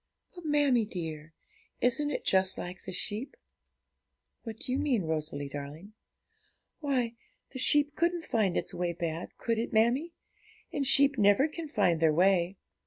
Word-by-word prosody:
'But, 355 -2 -11
mammie 290 -6 +3
dear, 160 -5 -6 0.4
isn't 290 +4 +2
it 290 - -4
just 190 0 +2
like 180 +1 -7
the 190 - -5
sheep?' 210 +7 -4 1.0
'What 225 -2 -7
do 250 - -2
you 260 - 0
mean, 250 -10 +1
Rosalie 155 -3 -3
darling?' 145 +8 -8 0.9
'Why, 260 -6 0 0.4
the 260 - -6
sheep 290 +2 +3
couldn't 340 0 0
find 215 - 0
its - - -2
way 175 -1 -2
back, 165 0 -5
could 230 -1 -1
it, 230 - -3
mammie? 245 +10 +2 0.7
sheep 275 -1 +4
never 205 +8 +5
can 320 +1 -7
find 190 - +2
their 160 -2 +3
way. 185 +1 +3
220 Hz, 150 wpm, -30 LUFS, 175-275 Hz, 1.0 s, never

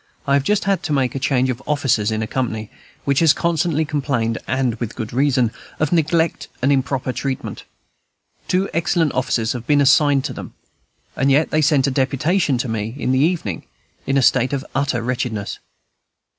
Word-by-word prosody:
I 140 - +1
have 140 -1 +3
just 210 +7 +1
had 195 -1 +1
to 150 - -2
make 130 -3 +1
a 135 - -3
change 130 -1 +1
of 125 +1 -6
officers 135 -8 +1
in 110 0 -1
a - - -2
company 110 -4 -3 0.3
which 140 -1 +2
has 165 -3 +5
constantly 165 -2 0
complained, 135 -7 -1
and 130 -1 0
with 120 -3 -4
good 110 -2 -5
reason, 130 -3 +2 0.3
of 155 - 0
neglect 165 0 +1
and 135 +3 +2
improper 135 -1 0
treatment. 135 0 -4 0.8
Two 185 +2 +1
excellent 165 -2 +1
officers 120 -3 0
have 120 -2 -7
been 145 -1 +4
assigned 140 0 +4
to - - -3
them; - - -9 0.6
and 135 - +1
yet 145 +3 +3
they 155 - +2
sent 140 -2 +3
a 140 - 0
deputation 140 +3 +1
to 125 - -2
me 110 +1 -3
in 130 - -1
the 130 - +2
evening, 150 - -1 0.4
in 135 - +2
a 135 - +3
state 125 +2 +3
of 140 +1 -2
utter 130 -5 0
wretchedness. 120 -4 -3
135 Hz, 185 wpm, -20 LUFS, 125-150 Hz, 0.8 s, has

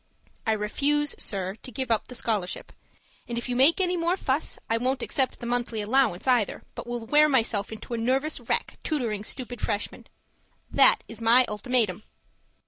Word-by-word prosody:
I 220 - +4
refuse, 285 +8 +1
sir, 190 -2 -3
to 255 - -9
give 255 +1 -3
up 225 - +1
the 250 - -8
scholarship; 215 -6 -2 0.6
and 235 - -4
if 235 - -3
you 250 - -2
make 275 +8 +5
any 360 -1 +2
more 345 +2 0
fuss, 280 -2 -1
I 225 - +1
won't 255 +3 -1
accept 265 -2 0
the - - -7
monthly 240 -2 -1
allowance 215 -3 +1
either, 245 -6 +1
but - - -8
will 240 -1 -4
wear 300 +5 +5
myself 225 -7 +1
into 220 +2 -7
a 235 - -1
nervous 265 +6 0
wreck - - -2
tutoring 235 -9 -2
stupid 245 0 -4
Freshmen. 205 0 -3 0.6
That - - +5
is 225 0 -7
my 235 +3 +6
ultimatum! 215 -3 0
240 Hz, 175 wpm, -26 LUFS, 220-265 Hz, 0.6 s, my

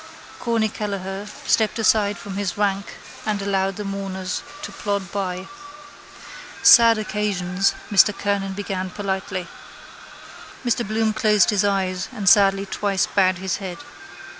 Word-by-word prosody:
Corny 230 -2 +1
Kelleher 200 -1 -5 0.2
stepped 220 0 +2
aside 215 -2 +2
from 200 - -8
his 200 -2 -3
rank 200 -1 -1 0.3
and 210 -2 -1
allowed 195 -1 0
the 210 - -5
mourners 195 -2 -4 0.2
to - - -6
plod 200 -3 -3
by. 190 -1 -3 1.2
—Sad 230 -1 +8
occasions, 195 -3 -1 0.2
Mr 205 +1 +6
Kernan 200 -1 -1
began 190 -2 -4
politely. 190 -2 -4 1.2
Mr 240 -2 0
Bloom 220 +1 0
closed 210 -2 +3
his 205 -1 +2
eyes 190 -2 0
and 200 -2 -5
sadly 195 0 +5
twice 195 0 0
bowed 185 -2 +2
his 190 0 -2
head. 190 -3 -6
200 Hz, 130 wpm, -22 LUFS, 190-210 Hz, 1.2 s, Sad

